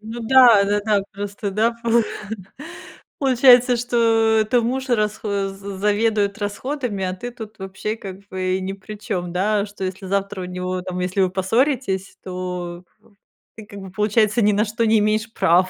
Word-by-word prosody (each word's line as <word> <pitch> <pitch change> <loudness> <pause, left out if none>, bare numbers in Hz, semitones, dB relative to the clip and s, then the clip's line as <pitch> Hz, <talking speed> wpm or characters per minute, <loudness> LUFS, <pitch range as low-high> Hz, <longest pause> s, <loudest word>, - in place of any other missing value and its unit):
Ну 225 +2 -7
да, 240 -4 +7
да-да, 205 0 +1
просто, 200 0 -5
да, 220 +4 +1
полу 235 0 +3 1.2
получается, 250 -2 +5
что 230 -2 +2
это 240 +2 +1
муж 260 +3 -2
расхо 210 -3 0
з 195 0 -8
заведует 210 0 +1
расходами, 210 0 -3
а 185 - -2
ты 240 +6 -6
тут 220 -3 -10
вообще, 195 +3 -4
как 195 -3 -9
бы, 185 0 -1
и - - -3
ни 190 +1 -3
при 200 +2 -9
чём, 180 -4 -4
да. 205 +3 +1
Что 200 -2 -7
если 185 +1 -5
завтра 195 0 -2
у - - -4
него 180 0 -3
там 180 -1 -5
если 180 +2 -1
вы 185 - +2
поссоритесь, 195 0 0
то 180 -1 -5
в 215 - -39 0.5
ты, 215 - -10
как 200 -1 -10
бы, 190 -1 -9
получается, 210 +2 +2
ни 210 - +4
на 210 +2 +2
что 225 +2 -1
не 220 0 +4
имеешь 215 +1 0
права, 180 +3 +3
205 Hz, 175 wpm, -21 LUFS, 190-225 Hz, 1.2 s, да